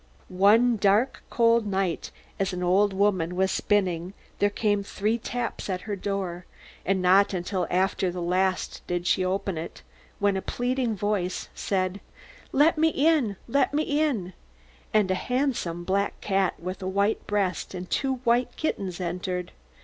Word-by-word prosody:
"One 220 +6 +5
dark, 205 +6 +2
cold 230 -2 +3
night, 190 -4 -1 0.3
as 195 -1 0
an 180 0 -3
old 195 +3 +3
woman 190 -3 +1
was 190 +1 +2
spinning, 185 -2 0 0.2
there 205 - +3
came 205 0 0
three 210 +3 -1
taps 240 -2 -4
at 185 -1 -2
her 210 0 -4
door, 185 -3 -4 0.4
and 190 -1 0
not 190 +2 +5
until 180 0 -2
after 190 0 +1
the 180 0 -5
last 185 +2 0
did 175 0 -2
she 185 - +2
open 185 -2 -1
it, 165 - -8 0.3
when 200 -1 +2
a 190 - -1
pleading 245 0 -1
voice 200 -2 -2
said: 190 0 -1 0.5
'Let 305 +3 +4
me 320 - +5
in, 295 -9 +2
let 280 +3 +1
me 305 - +2
in,' 285 - 0 0.6
and 210 -3 +3
a - - +4
handsome 235 -6 -1
black 200 +3 -1
cat, 195 -2 0
with 185 +3 -6
a 185 - -3
white 200 +3 0
breast, 195 -3 -1
and 180 0 -6
two 265 +5 0
white 240 +1 +2
kittens, 195 - -2
entered. 180 0 -3
195 Hz, 155 wpm, -26 LUFS, 185-220 Hz, 0.6 s, One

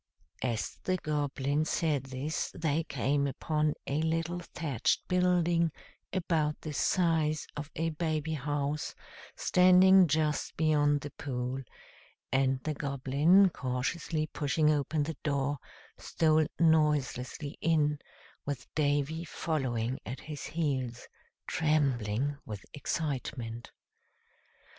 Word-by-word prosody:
As 115 -3 -2
the 185 0 +1
Goblin 145 -2 -1
said 155 -4 0
this 135 +4 -3
they 160 -1 0
came 140 0 0
upon 150 +2 0
a 145 +3 -1
little 165 +2 -1
thatched 155 -7 -1
building, 175 -2 +2 0.4
about 160 -5 0
the 155 - -5
size 160 -2 +1
of 150 0 -5
a 165 +1 0
baby 155 -1 -1
house, 145 0 -2 0.4
standing 185 +1 +6
just 155 0 0
beyond 145 -2 +3
the 145 - -6
pool; 130 -1 -3 0.7
and 130 0 +2
the 155 - -1
Goblin, 145 +7 +3
cautiously 140 +4 -2
pushing 150 +1 +1
open 150 +1 0
the 155 0 -4
door, 140 -1 0 0.4
stole 155 -1 +2
noiselessly 150 -3 +1
in, 150 -2 +2 0.4
with 140 -2 -4
Davy 145 +2 0
following 130 -7 -2
at 125 +4 -6
his 150 -3 -7
heels, 135 -7 -2 0.4
trembling 140 -4 0
with 105 -3 -8
excitement. 130 -6 -3
150 Hz, 105 wpm, -31 LUFS, 140-160 Hz, 0.7 s, standing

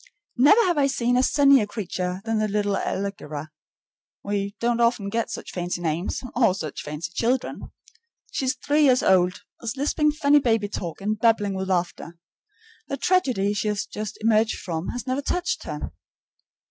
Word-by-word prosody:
Never 295 - +6
have 350 -7 +2
I 275 - +4
seen 245 -2 0
a 250 - +4
sunnier 275 -4 +4
creature 185 -3 -4
than 225 -1 0
the 215 - +1
little 205 -1 0
Allegra 155 -8 -4 0.7
(we 200 0 -2
don't 235 0 +1
often 235 -4 +2
get 230 +2 -1
such - - -6
fancy 175 -1 -3
names 170 +6 -2
or 230 -7 +3
such 155 -6 -5
fancy 150 +2 -6
children). 245 +2 -1 0.6
She 270 - -2
is 260 +3 +1
three 295 +1 +2
years 255 -2 +4
old, 180 -1 +3 0.2
is 235 +2 -4
lisping 300 +2 +2
funny 295 -1 +4
baby 225 -6 +1
talk 175 -3 -5
and 210 +1 -1
bubbling 220 -3 +2
with 190 0 -3
laughter. 175 -1 -2 0.7
The 275 - -3
tragedy 255 - +1
she 205 +1 -2
has 210 -1 -1
just 215 -1 -6
emerged 220 0 +2
from 165 -1 -4
has 245 -3 -4
never 260 +2 -1
touched 355 +5 -2
her. - - -5
215 Hz, 170 wpm, -24 LUFS, 190-255 Hz, 0.7 s, Never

